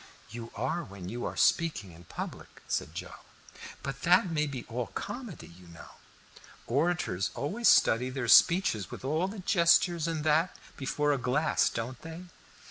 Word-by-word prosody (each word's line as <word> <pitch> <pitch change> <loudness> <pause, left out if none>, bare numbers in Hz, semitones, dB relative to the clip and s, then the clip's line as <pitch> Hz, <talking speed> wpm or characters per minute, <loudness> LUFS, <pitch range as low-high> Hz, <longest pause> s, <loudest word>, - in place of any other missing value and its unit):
"You 115 0 -8
are 135 +9 -2
when 95 -2 -9
you 120 +3 -4
are - - -5
speaking 130 - +1
in 85 +1 -15
public," - - -8
said - - -2
Joe. - - -7 0.7
"But 135 0 -5
that 180 +1 +4
may 150 -1 0
be 130 -4 -6
all 120 0 -3
comedy, 235 - -7
you 90 +1 -16
know. 85 -1 -13 0.8
Orators 135 - 0
always 215 +12 -1
study 125 +3 +5
their 130 -2 -3
speeches, 165 - +5
with - - -9
all 155 +6 0
the 205 +3 -7
gestures 170 -2 +3
and 160 -2 -2
that, 155 +4 +2 0.2
before 145 +1 0
a 140 - -1
glass, 125 +5 +1
don't 120 +2 -5
they?" 165 +2 -8
140 Hz, 160 wpm, -29 LUFS, 115-170 Hz, 0.8 s, study